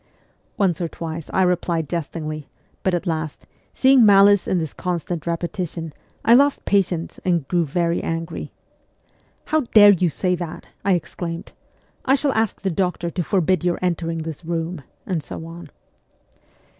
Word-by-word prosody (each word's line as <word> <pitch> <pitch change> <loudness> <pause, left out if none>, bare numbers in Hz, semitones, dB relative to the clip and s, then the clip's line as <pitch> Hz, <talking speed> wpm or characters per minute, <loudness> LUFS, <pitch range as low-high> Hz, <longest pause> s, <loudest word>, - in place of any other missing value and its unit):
Once 185 -5 +1
or 170 - 0
twice 165 -1 -6
I 190 - +3
replied 175 -3 0
Jestingly, 155 -2 -4 0.3
but 190 -2 +1
at 175 - -3
last, 160 -3 -3 0.3
seeing 265 -2 +6
malice 200 -1 +6
in 185 - +1
this 160 -3 -3
constant 175 -2 -3
repetition, 170 -1 -3 0.3
I 230 - +7
lost 280 +3 +4
patience 180 -4 0
and 170 -6 +1
grew 175 0 +1
very 170 +3 0
angry. 165 0 -4 0.5
' - - -39
How 315 - +3 0.2
dare 205 -1 +10
you 180 -2 +2
say 180 +3 0
that? 170 -1 -5
' - - -41
I 200 - +3
exclaimed. 170 -1 -4 0.3
' - - -38
I 270 - +5
shall 280 -1 +1
ask 220 -2 0
the 195 - -1
doctor 175 -1 -1
to 180 - -2
forbid 185 -1 +1
your 175 -1 +1
entering 165 -2 -1
this 160 0 -7
room,' 165 0 -3 0.2
and 180 -5 -1
so 160 - -8
on. 170 +1 -10
175 Hz, 165 wpm, -22 LUFS, 165-190 Hz, 0.5 s, dare